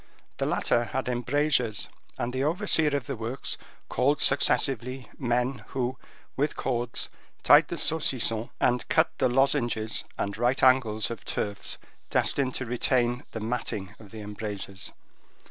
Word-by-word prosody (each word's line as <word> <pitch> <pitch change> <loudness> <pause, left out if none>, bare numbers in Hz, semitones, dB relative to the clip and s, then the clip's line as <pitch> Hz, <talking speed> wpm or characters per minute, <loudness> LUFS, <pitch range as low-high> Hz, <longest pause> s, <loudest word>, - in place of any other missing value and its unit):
The - - 0
latter 120 - +1
had 130 +2 -3
embrasures, 125 -1 +1 0.3
and 120 +1 -2
the 130 +1 0
overseer 160 -2 +3
of 135 - -6
the - - -3
works 115 +4 -2 0.3
called 145 +3 +2
successively 130 -1 +2
men 125 -1 0
who, 130 -1 -2 0.4
with 145 +3 0
cords, 120 -2 -2 0.3
tied - - +7
the - - -4
saucissons 120 -7 +1
and 125 0 +1
cut - - +3
the - - +3
lozenges 120 -4 +2
and 100 0 -2
right 120 +3 +2
angles 120 -5 +4
of 115 - -6
turfs 100 -1 -2 0.3
destined 130 -2 +1
to 130 - -2
retain 120 +1 +1
the 115 - -6
matting 110 -4 -3
of 105 -3 -13
the 110 +1 -9
embrasures. 105 -2 -5
120 Hz, 140 wpm, -27 LUFS, 110-130 Hz, 0.4 s, tied